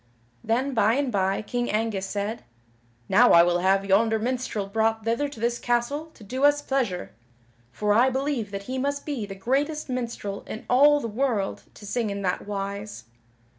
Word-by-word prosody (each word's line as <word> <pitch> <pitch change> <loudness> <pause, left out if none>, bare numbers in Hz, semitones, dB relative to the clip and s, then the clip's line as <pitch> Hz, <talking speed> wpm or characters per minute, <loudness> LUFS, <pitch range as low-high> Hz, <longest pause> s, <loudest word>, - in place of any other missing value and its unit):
Then 255 +5 0
by 225 -1 +3
and 280 -2 0
by 195 -1 0
King 245 +3 -2
Angus 210 -3 -1
said: 205 +3 -3 0.6
"Now 240 +6 +6
I 170 - +8
will 175 0 +2
have 195 +2 +2
yonder 220 +3 +3
minstrel 240 -3 -2
brought 220 +2 0
thither 235 +6 0
to 280 - -11
this 235 +1 0
castle 245 +6 -1
to 220 - -14
do 255 +7 -4
us 290 0 +5
pleasure, 250 -11 -1 0.6
for 210 +6 0
I 240 +5 +5
believe 265 -4 -2
that 200 0 -6
he 260 +5 -4
must 285 +1 -2
be 265 -9 -3
the 195 - -7
greatest 280 +9 -1
minstrel 235 -5 -4
in 220 - -7
all 290 +4 +5
the 230 - -3
world 220 -3 -1
to 210 - -12
sing 230 +1 -1
in 200 0 -4
that 185 +1 -2
wise." 200 - -5
225 Hz, 180 wpm, -25 LUFS, 200-260 Hz, 0.6 s, I